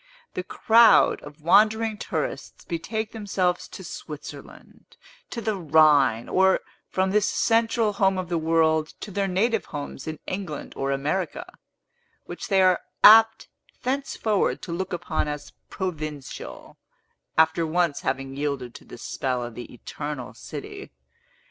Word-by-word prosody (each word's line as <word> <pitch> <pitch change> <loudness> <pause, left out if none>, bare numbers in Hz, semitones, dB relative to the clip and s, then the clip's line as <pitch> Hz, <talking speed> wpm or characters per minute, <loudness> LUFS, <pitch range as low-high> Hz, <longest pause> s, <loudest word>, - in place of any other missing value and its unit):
The - - -2
crowd 225 +5 +5
of 145 +1 -12
wandering 215 +5 +4
tourists - - -4
betake 215 +6 -3
themselves 190 -5 -1
to - - -10
Switzerland, - - -10 0.3
to 235 - -5
the 220 -1 -1
Rhine, 150 - +4
or, 190 0 +3 0.3
from 190 0 0
this 210 0 +2
central 225 -1 +2
home 195 -1 +2
of 185 -1 -3
the 170 -1 -1
world, 160 -1 +1
to 210 - -7
their 200 +1 -1
native 210 +4 +1
homes 145 -1 -7
in 155 0 -4
England 185 -6 -5
or 135 - -2
America, 150 +7 -2 0.8
which - - -7
they 195 -3 +4
are 185 -1 +4 0.2
apt 220 +1 +8 0.4
thenceforward 255 -5 -1
to 175 - -6
look 185 +3 -3
upon 175 -3 -2
as 150 0 -6 0.2
provincial, 155 -7 -6 0.6
after 160 +1 +4
once 165 -2 +1
having 135 0 -3
yielded 140 -4 -3
to - - -13
the - - -11
spell 125 -2 -3
of 120 -1 -7
the 120 +2 -9
Eternal 145 +1 -6
City. 405 -1 -8
180 Hz, 135 wpm, -25 LUFS, 150-210 Hz, 0.8 s, apt